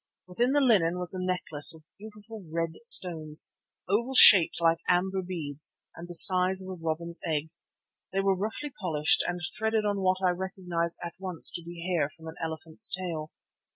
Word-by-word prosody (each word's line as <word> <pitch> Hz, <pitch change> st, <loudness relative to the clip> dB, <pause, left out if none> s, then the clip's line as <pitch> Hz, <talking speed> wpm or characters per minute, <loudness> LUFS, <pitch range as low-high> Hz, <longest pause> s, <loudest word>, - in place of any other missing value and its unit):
Within 235 Hz, +9 st, -2 dB
the 290 Hz, -, +2 dB
linen 185 Hz, -10 st, +1 dB
was 180 Hz, 0 st, -3 dB
a 185 Hz, -, -6 dB
necklace 165 Hz, -5 st, +2 dB
of 160 Hz, -, -17 dB, 0.2 s
beautiful 210 Hz, 0 st, -13 dB
red 165 Hz, 0 st, -3 dB
stones, 160 Hz, -8 st, +2 dB, 0.4 s
oval 235 Hz, +7 st, -2 dB
shaped 185 Hz, -10 st, +7 dB
like 165 Hz, 0 st, 0 dB
amber 190 Hz, +2 st, -1 dB
beads 155 Hz, -5 st, -4 dB, 0.2 s
and 170 Hz, -, -11 dB
of -, -, -15 dB
the 175 Hz, -, +1 dB
size 185 Hz, +1 st, +8 dB
of 185 Hz, -, -11 dB
a -, -, -6 dB
robin's 170 Hz, +1 st, -5 dB
egg. 155 Hz, 0 st, -4 dB, 0.6 s
They 195 Hz, +1 st, -2 dB
were 195 Hz, -1 st, 0 dB
roughly 220 Hz, +9 st, -6 dB
polished 155 Hz, -5 st, 0 dB
and 175 Hz, 0 st, -5 dB, 0.2 s
threaded 220 Hz, -1 st, -2 dB
on 205 Hz, -1 st, -2 dB
what 185 Hz, 0 st, 0 dB
I 180 Hz, -, +2 dB
recognized 180 Hz, -2 st, -4 dB
at 170 Hz, -, -8 dB
once 185 Hz, -3 st, +2 dB
to 170 Hz, -, -6 dB
be 170 Hz, 0 st, -11 dB
hair 170 Hz, -6 st, -2 dB
from 160 Hz, +1 st, -16 dB
an 160 Hz, -, -10 dB
elephant's 160 Hz, +6 st, 0 dB
tail. 170 Hz, -4 st, -5 dB
180 Hz, 185 wpm, -26 LUFS, 165-195 Hz, 0.6 s, size